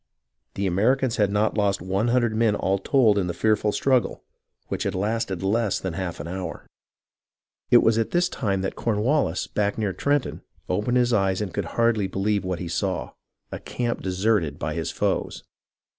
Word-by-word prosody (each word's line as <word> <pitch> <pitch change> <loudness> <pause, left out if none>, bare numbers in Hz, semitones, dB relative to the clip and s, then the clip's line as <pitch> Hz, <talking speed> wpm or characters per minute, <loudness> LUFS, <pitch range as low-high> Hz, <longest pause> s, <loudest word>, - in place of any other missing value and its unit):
The 100 - -1
Americans 115 +7 +1
had 105 -3 +3
not 105 +2 +1
lost 100 -1 +1
one 95 +5 -1
hundred 120 -2 +2
men 110 -2 +2
all 95 -1 0
told 110 -2 +3
in 90 - -1
the 85 - -3
fearful 105 +1 +2
struggle, 130 +2 +1 0.4
which - - -4
had - - -1
lasted 100 -1 -2
less 110 +1 +1
than 95 -3 -4
a - - -7
half 90 -3 -4
hour. 85 +3 -5 1.0
It - - +6
was 115 0 +3
at 115 - 0
this 175 0 +2
time 100 - -2
that 95 - -3
Cornwallis, 115 - 0
back 105 -1 -1
near 105 -4 -1
Trenton, 145 +4 -1 0.3
opened 105 +7 0
his 120 -1 +2
eyes 95 -3 +2
and 100 -5 -4
could - - -2
hardly 115 -4 +2
believe 100 +2 -1
what 90 -1 -2
he 90 - -5
saw 90 +3 -2 0.2
— - - -60
a - - -5
camp 120 -1 -3
deserted 95 -5 0
by 75 - -3
his 80 -1 -3
foes. - - -2
105 Hz, 185 wpm, -24 LUFS, 95-115 Hz, 1.0 s, It